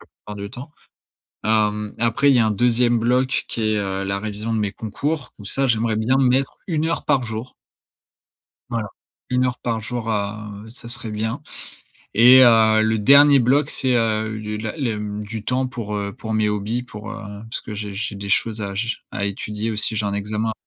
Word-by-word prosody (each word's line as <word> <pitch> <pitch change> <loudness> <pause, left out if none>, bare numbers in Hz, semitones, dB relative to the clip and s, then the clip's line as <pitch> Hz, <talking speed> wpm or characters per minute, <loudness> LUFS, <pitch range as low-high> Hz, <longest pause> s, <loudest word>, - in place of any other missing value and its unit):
la - - -17
plupart 105 0 -12
du 100 0 -6
temps, 130 +4 -9 0.7
hem, 105 -1 +1
après 120 +5 +3
il - - +4
y 120 - +5
a 110 - +3
un - - +1
2e 120 +2 +2
bloc 125 +3 +1
qui 115 - -4
est, 110 -1 +1
heu, 95 -1 -2
la 100 0 -1
révision 110 +2 -3
de - - 0
mes 105 -2 -1
concours 125 +7 -4
où 105 - -12
ça, 135 +6 +1
j'aimerais 115 -1 +1
bien 125 +5 +2
mettre 130 0 +2
1 160 -2 0
heure 165 - -2
par 140 -3 +2
jour. 110 +3 -5 1.2
Voilà. 115 -2 -2 0.4
1 125 0 +2
heure 125 0 -3
par 115 -2 -2
jour 115 +1 -4
à, 105 0 -3 0.2
heu, - - -12
ça 120 0 -12
serait 120 -2 +5
bien 110 +6 -3 0.7
et 125 +4 +8
heu, 110 -2 +6
le 110 0 +1
dernier 140 +4 +7
bloc 135 +4 +3
c'est, 130 -2 0
heu, 110 -1 +1
le 105 0 -4
la 110 +5 -5
le, 120 -8 -2
mmh, 105 0 -4
du 110 0 -6
temps 130 +2 0
pour, 115 -5 -5
heu, 100 -1 -3
pour 115 -3 -6
mes 110 -1 +2
hobbies, 105 +4 -2
pour, 105 -3 -9
heu, - - -6 0.3
parce - - -4
que 110 - -7
j'ai 105 -1 -5
j'ai 105 +1 -4
des 100 0 -7
choses 110 +2 0
à 100 -1 -4
j 115 +4 -1
à 100 - -3
étudier, 105 +2 -3
aussi, 110 +1 -1
j'ai 105 -1 0
un 100 - -2
examen 105 +2 -2
110 Hz, 210 wpm, -21 LUFS, 105-125 Hz, 1.2 s, et